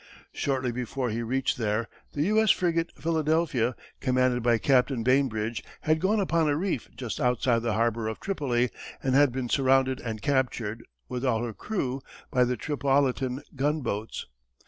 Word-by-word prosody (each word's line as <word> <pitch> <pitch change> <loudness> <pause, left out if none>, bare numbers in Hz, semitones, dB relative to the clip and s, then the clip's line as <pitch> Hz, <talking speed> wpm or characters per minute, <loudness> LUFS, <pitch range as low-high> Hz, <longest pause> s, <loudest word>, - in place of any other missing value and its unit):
Shortly 130 -3 -1
before 125 0 -3
he 115 +2 -2
reached 130 +3 0
there, 110 +1 0 0.3
the 145 - 0
U.S. 215 +4 +3
frigate 170 -2 +2
Philadelphia, 155 -6 +1 0.2
commanded 130 -1 +2
by 120 0 +3
Captain 130 -1 +2
Bainbridge, 115 -5 +1 0.2
had 155 0 +1
gone 210 +3 +2
upon 165 -5 +2
a 145 - +2
reef 175 - -2
just 120 -4 -4
outside 125 -1 +2
the 115 -1 0
harbor 115 0 +1
of 110 - -4
Tripoli 125 - 0 0.3
and 130 - +1
had 140 -1 +5
been 130 0 -3
surrounded 130 0 +3
and 110 -2 -4
captured, 120 -5 0 0.2
with 125 0 -4
all 120 -3 +1
her 120 -2 -3
crew, 135 - -3 0.3
by 125 -1 +4
the 125 0 -1
Tripolitan 135 -2 0
gunboats. 130 -6 -2
130 Hz, 155 wpm, -27 LUFS, 120-145 Hz, 0.3 s, had